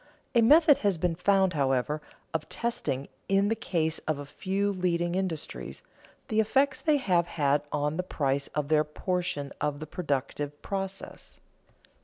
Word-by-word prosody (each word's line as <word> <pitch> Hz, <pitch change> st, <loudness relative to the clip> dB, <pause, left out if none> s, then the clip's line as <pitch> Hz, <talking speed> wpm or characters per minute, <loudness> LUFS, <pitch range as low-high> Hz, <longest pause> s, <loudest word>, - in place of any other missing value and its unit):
A 235 Hz, -, +5 dB
method 295 Hz, +5 st, +7 dB
has 200 Hz, -4 st, +1 dB
been 175 Hz, +1 st, +1 dB
found, 190 Hz, +2 st, +3 dB
however, 140 Hz, +1 st, +1 dB, 0.3 s
of 160 Hz, -1 st, -2 dB
testing, 140 Hz, -, -2 dB, 0.2 s
in 195 Hz, +1 st, +3 dB
the 225 Hz, -, +2 dB
case 160 Hz, -7 st, -1 dB
of 155 Hz, -2 st, +1 dB
a 145 Hz, -, -6 dB
few 195 Hz, +7 st, -1 dB
leading 175 Hz, -2 st, 0 dB
industries, 180 Hz, -5 st, -3 dB, 0.4 s
the 215 Hz, -, +1 dB
effects 270 Hz, +5 st, +2 dB
they 305 Hz, -2 st, +3 dB
have 180 Hz, -10 st, +2 dB
had 145 Hz, -2 st, +1 dB
on 150 Hz, +1 st, 0 dB
the -, -, +1 dB
price 140 Hz, -6 st, -1 dB
of 150 Hz, -1 st, -1 dB
their 155 Hz, -1 st, +4 dB
portion 150 Hz, -2 st, -2 dB
of 145 Hz, -1 st, -1 dB
the 155 Hz, -, -5 dB
productive 145 Hz, -2 st, -3 dB
process. 195 Hz, -1 st, -5 dB
175 Hz, 155 wpm, -28 LUFS, 150-195 Hz, 0.4 s, method